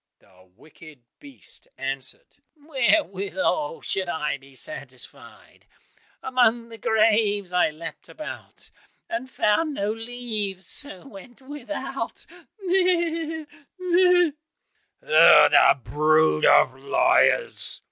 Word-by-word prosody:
The 95 -1 -25
wicked 155 +1 -17 0.2
beast 280 -2 -11
answered, 135 0 -6 0.2
"Wherewithal 295 - -1
should 190 -2 -3
I 150 -3 -3
be 135 0 -19
satisfied? 305 - -9 0.6
Among 240 -3 +1
the 225 -1 -12
graves 210 -3 +1
I 180 -2 +3
leapt 160 +2 -10
about, 310 - -10 0.4
And 335 -7 -4
found 285 +8 0
no 205 -2 -2
leaves, 225 -5 -5
so 270 +2 -1
went 225 +1 -14
without, 290 +1 -6 0.4
meh! 340 -4 0 0.3
meh!" 360 -2 +3 0.7
"Oh, - - +6
the - - +5
brood 155 +1 +2
of 130 - +5
liars!" 140 - +2
225 Hz, 95 wpm, -23 LUFS, -, 0.7 s, Oh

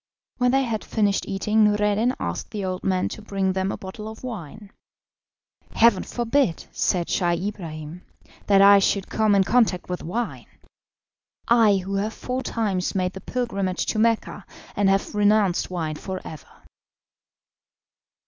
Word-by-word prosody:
When 250 0 +2
they 270 +2 +3
had 225 -4 -3
finished 205 -3 0
eating 210 +3 +1
Noureddin 210 +3 +2
asked - - -4
the 205 -3 -4
old 185 0 -4
man 185 -1 +1
to - - -8
bring 195 -2 -1
them 190 +1 -1
a - - -4
bottle 210 +3 -8
of 220 +2 -10
wine. 210 - -8 1.0
"Heaven 225 -4 +5
forbid," 240 -5 0
said 175 -2 0
Scheih 175 -1 +1
Ibrahim, 165 -4 -8 0.5
"that 195 -1 +6
I 200 0 +8
should 195 0 0
come 215 -2 +2
in 195 - +4
contact 215 -5 +1
with 180 - -3
wine! 230 +8 -4 1.0
I 225 -4 +5
who 195 - -4
have 210 +3 -2
four 255 +1 -3
times 200 -8 -2
made 185 -1 0
the 190 - -8
pilgrimage 200 -7 -2
to 215 - -1
Mecca, 230 0 0 0.3
and 200 -1 +2
have 195 0 0
renounced 205 -3 +2
wine 160 -4 -3
for 190 +2 -5
ever." 155 -4 -10
200 Hz, 150 wpm, -24 LUFS, 185-220 Hz, 1.0 s, I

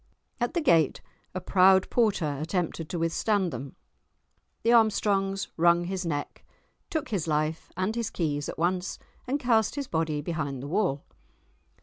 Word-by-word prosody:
At 240 +7 -1
the 340 - +2
gate 165 - +3 0.4
a - - -1
proud 190 +1 +4
porter 190 - +1
attempted 165 -1 -2
to 175 - -3
withstand 175 +3 0
them. 130 +2 -7 0.9
The 235 - +4
Armstrongs 200 -3 +2
wrung 170 +1 +4
his 185 0 -3
neck, 145 -3 -4 0.5
took 315 -6 -2
his 190 -8 -1
life 155 +1 -1
and 185 +4 -1
his 230 -2 -1
keys 145 -6 -2
at - - -6
once, 180 +2 -1 0.3
and 275 +3 0
cast 230 -4 +2
his 285 -1 -3
body 160 -2 -1
behind 145 -4 -3
the - - -5
wall. 170 -5 0
180 Hz, 150 wpm, -27 LUFS, 155-215 Hz, 0.9 s, proud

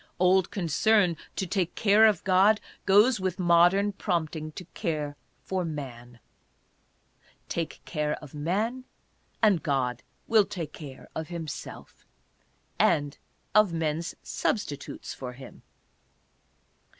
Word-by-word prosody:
Old 185 0 +4
concern 190 +1 +2 0.2
to 190 - -1
take 180 -2 -1
care 215 +1 +6
of 210 -6 +1
God 195 +3 +4 0.3
goes 210 +4 +5
with 185 -1 -2
modern 175 +3 +4
prompting 160 -5 -2
to 180 - -8
care 150 -6 -3 0.3
for 190 -1 -2
man. 125 -7 -7 1.3
Take 165 -2 -3
care 150 -2 -1
of 150 -3 -12
man, 210 +12 -1 0.6
and 200 -7 +5
God 125 -4 -1 0.3
will 220 -3 +5
take 165 -6 -6
care 135 -4 -10
of 160 -1 -4
himself 165 -4 -8 0.4
— - - -40
and 145 -3 +2 0.3
of 210 -4 +5
men's 165 0 -2
substitutes 150 - -3
for 125 -2 -7
him. 130 0 -12
170 Hz, 115 wpm, -27 LUFS, 150-195 Hz, 1.3 s, care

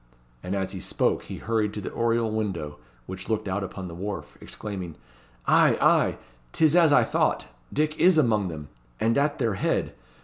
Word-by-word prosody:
And 95 +2 -3
as 95 -1 -2
he 95 - -6
spoke - - 0
he - - -7
hurried 110 -2 -1
to - - -3
the - - -5
oriel 115 -1 +1
window 95 -9 -3 0.3
which 95 - -8
looked 110 -1 -1
out 95 +1 -1
upon 95 0 -6
the 85 - -8
wharf, 95 +4 -6
exclaiming 95 -6 -6 0.5
"Ay, - - +4
ay, - - +3 0.4
't - - +3
is 155 +1 +4
as 170 -4 +6
I 145 - +6
thought. - - 0 0.3
Dick 155 +1 -1
is 180 -1 +5
among 110 -9 +3
them, 75 -4 -7 0.3
and 115 +1 +2
at 145 +1 +1
their 115 -6 0
head. 95 - -1
105 Hz, 190 wpm, -26 LUFS, 95-115 Hz, 0.5 s, as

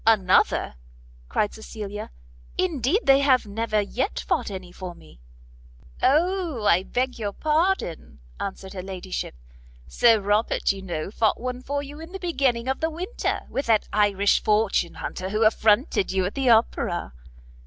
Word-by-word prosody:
"Another?" 195 - +3 0.5
cried 205 - 0
Cecilia; 210 -2 -7 0.5
"indeed 345 - +1
they 270 0 +6
have 265 -4 +3
never 215 +1 -1
yet 250 - -2
fought - - -1
any 185 -3 -7
for 180 -1 -8
me." 75 - -17 0.8
"O, 325 - +1
I 180 -2 +5
beg 250 +5 -2
your 205 -2 -3
pardon," 310 - 0 0.2
answered 190 0 -5
her 185 - -5
ladyship, 185 - -5 0.5
"Sir 225 - +4
Robert, 205 +3 +1
you 195 -1 -6
know, 175 -1 -4
fought 220 0 +1
one 250 +1 -4
for 285 +2 -3
you 290 +2 -10
in 325 +3 -10
the 385 - -5
beginning 265 -9 0
of 265 - -1
the 320 - 0
winter, 355 +8 -3
with 275 - -3
that 220 -2 +3
Irish 205 -1 +3
fortune 210 -5 +1
hunter 185 +1 -5
who 215 +3 +1
affronted 215 - +3
you 190 -1 +1
at 195 - -3
the 270 -2 +1
Opera." 220 - +2
220 Hz, 155 wpm, -24 LUFS, 195-275 Hz, 0.8 s, they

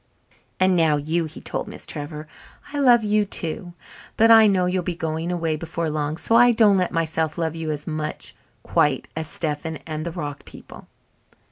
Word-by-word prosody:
"And 185 0 +4
now 160 -3 +3
you," 160 +3 -1
he 155 - -9
told - - -4
Miss - - -7
Trevor. 150 0 -6 0.5
"I 290 - -2
love 245 -4 +5
you 210 0 +2
too, 175 -2 -4 0.4
but 225 +1 +6
I 225 -1 +8
know 190 -3 +2
you'll 180 +1 0
be 175 0 -3
going 160 0 -3
away 165 -3 -1
before 165 0 -3
long, 150 0 -2
so 225 - +1
I 245 +1 +7
don't 215 -3 +5
let 180 -2 0
myself 160 -2 -1
love 165 -1 -2
you 165 -1 -4
as 150 -1 -4
much 155 -1 -5 0.3
quite 140 -3 +1
as 160 -1 -3
Stephen 160 0 -3
and 155 -1 -4
the 170 - -4
rock 145 -4 -6
people." - - -13
165 Hz, 190 wpm, -23 LUFS, 155-185 Hz, 0.5 s, I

